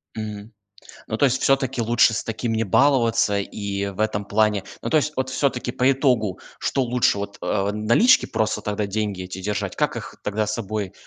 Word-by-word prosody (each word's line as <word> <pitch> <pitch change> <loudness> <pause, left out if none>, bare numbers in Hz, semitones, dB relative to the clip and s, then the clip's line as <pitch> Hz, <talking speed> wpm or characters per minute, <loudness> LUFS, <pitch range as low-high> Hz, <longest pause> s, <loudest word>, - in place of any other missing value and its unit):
Мгм. 105 0 -6 0.6
Ну, 110 - -3
то 140 - +2
есть 135 -1 +2
всё-таки 135 -3 +1
лучше 115 0 +4
с 110 - -3
таким 115 +1 -3
не 110 0 0
баловаться, 115 -3 +3
и 100 0 -3
в 100 +1 -7
этом 110 -1 0
плане 105 -2 +1 0.2
ну, - - -3
то - - +3
есть 150 0 -1
вот 130 0 -1
всё-таки 130 -2 -1
по 130 +1 +3
итогу, 125 -8 +1 0.2
что 135 - 0
лучше 125 -4 +2
вот, 100 0 -6
э, 100 +1 0
налички 115 - +4
просто 110 -1 -1
тогда 105 -1 -2
деньги 100 -2 -2
эти 90 +1 -7
держать? 100 +1 -3
Как - - 0
их - - -7
тогда 105 +1 -1
с 105 - -2
собой, 110 -2 -3
э, - - -22
110 Hz, 200 wpm, -23 LUFS, 100-125 Hz, 0.6 s, лучше